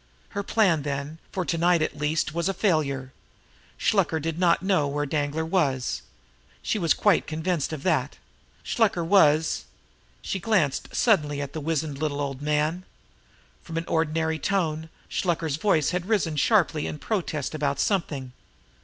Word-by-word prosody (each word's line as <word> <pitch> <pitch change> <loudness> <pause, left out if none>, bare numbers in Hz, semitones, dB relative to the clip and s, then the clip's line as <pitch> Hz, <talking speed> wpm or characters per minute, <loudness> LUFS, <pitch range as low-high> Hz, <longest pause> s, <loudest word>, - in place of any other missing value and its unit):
Her 200 - -3
plan 195 -6 +2
then, 140 +2 -4
for 185 -2 -2
to 165 - -1
night 170 -1 +4
it - - -2
least, 150 +1 -1
was 170 +2 0
a 195 - -2
failure. 140 -9 0 0.6
Shluker 180 -6 +2
did 165 +2 -3
not 175 -1 +3
know 185 -7 +2
where 145 +1 -1
Danglar 145 +2 -1
was. 145 -8 0 0.6
She 215 - 0
was 165 -3 +3
quite 205 -5 +3
convinced 160 -1 -1
of 155 -3 -5
that. 185 - 0 0.5
Shluker 205 -7 +1
was 160 -4 +4 0.6
She 195 - -2
glanced 180 -9 0
suddenly 150 - +2
at 140 -1 -5
the 155 - -4
wizened 155 -2 -2
little 145 -2 -1
old 140 -1 -3
man. 150 +4 0 0.8
From 165 -1 -7
an 165 - -2
ordinary 160 0 0
tone, 160 -4 -1 0.2
Shluker' 170 -3 -1
s 150 -2 -1
voice 165 -5 +2
had 180 0 -2
risen 185 -8 +1
sharply 160 -2 +2
in - - -5
protest 160 -7 -2
about 145 -2 -1
something. 145 -10 -1
160 Hz, 155 wpm, -26 LUFS, 150-180 Hz, 0.8 s, night